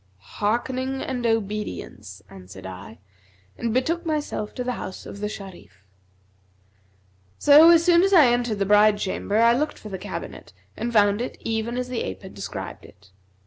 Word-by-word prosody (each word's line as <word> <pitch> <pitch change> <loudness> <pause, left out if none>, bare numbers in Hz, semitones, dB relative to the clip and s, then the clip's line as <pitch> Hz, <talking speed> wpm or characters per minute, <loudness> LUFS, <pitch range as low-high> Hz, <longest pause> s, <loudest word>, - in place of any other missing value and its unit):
'Hearkening 255 - -2
and 245 -2 -2
obedience,' 205 - -4
answered 95 0 -12
I, 95 +4 -9 0.6
and 235 - -3
betook 320 +9 0
myself 300 -9 -3
to 250 - -3
the 250 - -2
house 190 -6 -7
of 200 - -9
the 210 0 -3
Sharif. 190 - -11 1.5
So 300 +3 +7
as 335 -1 +6
soon 345 -1 +5
as 390 +1 +2
I 335 -7 +7
entered 240 -3 +1
the 200 - 0
bride 210 +1 +5
chamber, 205 +1 -2
I 230 +1 +5
looked 300 +5 -1
for 215 - -10
the 190 -2 -6
cabinet 205 +2 -8 0.2
and 235 - -3
found 205 -1 +3
it 245 - -5
even 225 +2 -2
as 250 0 -2
the 250 -2 -3
ape 95 0 -6
had - - -10
described - - -7
it. - - -18
225 Hz, 170 wpm, -24 LUFS, 200-255 Hz, 1.5 s, So